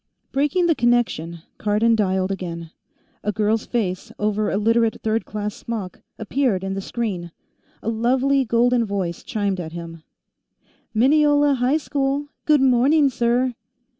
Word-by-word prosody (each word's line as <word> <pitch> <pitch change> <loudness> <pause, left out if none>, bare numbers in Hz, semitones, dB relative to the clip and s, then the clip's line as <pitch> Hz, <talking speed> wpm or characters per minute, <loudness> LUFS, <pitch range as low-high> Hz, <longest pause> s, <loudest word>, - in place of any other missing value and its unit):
Breaking 295 +6 +1
the 335 - +4
connection, 230 - 0 0.2
Cardon 215 +2 +2
dialed 190 -2 0
again. 170 -4 -5 0.5
A 210 - 0
girl's 215 +1 0
face, 190 -7 -2
over 210 0 0
a - - 0
Literate 230 +1 +2
Third 220 +1 0
Class 210 0 -4
smock, 215 -6 -6 0.2
appeared 220 -3 0
in 195 0 -2
the 195 - -3
screen; 195 -6 -3 0.5
a 225 - -1
lovely 260 +4 +2
golden 240 +1 +2
voice 195 -5 -3
chimed 200 -3 -2
at 160 -2 -6
him: 165 -1 -8 0.9
"Mineola 290 +4 +4
High 260 +3 +2
School; 285 -1 -2 0.2
good 300 -3 +5
morning, 270 +3 +4
sir." 245 +1 +1
225 Hz, 135 wpm, -22 LUFS, 195-260 Hz, 0.9 s, good